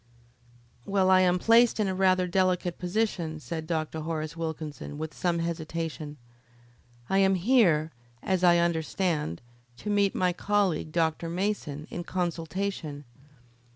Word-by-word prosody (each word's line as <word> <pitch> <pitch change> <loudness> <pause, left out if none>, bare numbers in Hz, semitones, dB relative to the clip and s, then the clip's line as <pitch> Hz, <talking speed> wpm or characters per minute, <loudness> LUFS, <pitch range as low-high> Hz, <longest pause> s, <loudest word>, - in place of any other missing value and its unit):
"Well, 190 -1 +3
I 185 - +7
am 180 -1 +3
placed 230 +4 +4
in 210 - +2
a 190 - -1
rather 185 -1 +3
delicate 180 -1 0
position," 180 -4 -1
said 160 +1 -6
Dr. 160 -1 -2
Horace 155 0 -4
Wilkinson, 160 -3 -5
with 155 -1 -5
some 175 +2 0
hesitation. 165 -2 -4 0.9
"I 195 - +2
am 195 0 +4
here, 175 -7 +3 0.3
as 185 -1 0
I 175 -1 +6
understand, 165 - -1 0.3
to 210 - -4
meet 200 -1 +2
my 180 -1 +1
colleague, 195 -5 0
Dr. 165 0 0
Mason, 170 -5 -2
in 175 - -4
consultation. 170 -3 -3
175 Hz, 130 wpm, -28 LUFS, 160-190 Hz, 0.9 s, I